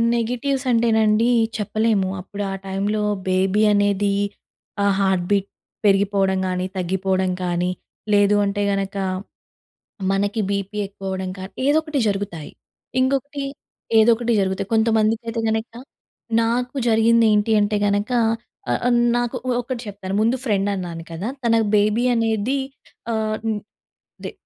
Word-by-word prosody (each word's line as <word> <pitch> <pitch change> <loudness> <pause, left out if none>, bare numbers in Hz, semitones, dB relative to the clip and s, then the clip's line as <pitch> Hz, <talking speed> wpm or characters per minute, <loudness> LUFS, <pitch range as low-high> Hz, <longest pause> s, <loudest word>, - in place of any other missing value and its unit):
Negatives 250 +4 -1
అంటే 235 0 +3
నండి 220 +2 +3 0.3
చెప్పలేము. 215 -2 +1
అప్పుడు 200 +2 -6
ఆ - - -3
టైంలో 200 +2 -1 0.3
బేబీ 190 +2 +2
అనేది 205 0 +2 0.7
ఆ - - +3
హార్ట్ 190 -2 +2
బీట్ 200 -1 +2 0.4
పెరిగిపోవడం 195 -1 +3
గానీ, 180 0 -1
తగ్గిపోవడం 190 +1 0
కానీ 175 0 0 0.4
లేదు 205 0 +4
అంటే 200 +1 -1
గనక 195 0 -2 1.2
మనకి 200 +3 0
బీపీ 200 +1 -3
ఎక్కువ 195 0 -9
అవ్వడం 190 0 -3
కానీ, 190 +1 -8
ఏదో 290 +2 +4
ఒకటి 305 -3 -2
జరుగుతాయి. 195 -6 -3 0.5
ఇంకొకటి 275 +2 -1 0.6
ఏదో 220 +2 +5
ఒకటి 235 +1 -1
జరుగుతాయి. 190 0 -1
కొంతమందికైతే 225 +1 +1
గనక 220 +1 -2 0.7
నాకు 245 +3 -1
జరిగింది 225 +1 +4
ఏంటి 210 +2 +2
అంటే 205 +1 +1
గనక 205 +3 0 0.6
ఆహ్, - - +2
ఆహ్, 245 - +3 0.2
నాకు 240 -1 -1
ఒ - - 0
ఒకటి 245 0 -5
చెప్పారు. 195 -2 -6
ముందు 230 +3 +2
ఫ్రెండ్ 205 -3 +1
అన్నాను 170 -3 -5
కదా! 170 +5 -5 0.2
తనకు 230 -1 +3
బేబీ 210 +3 +2
అనేది 225 +2 0 0.6
ఆహ్, 220 -1 -1 0.9
దె - - -4
205 Hz, 130 wpm, -22 LUFS, 195-230 Hz, 1.2 s, ఏదో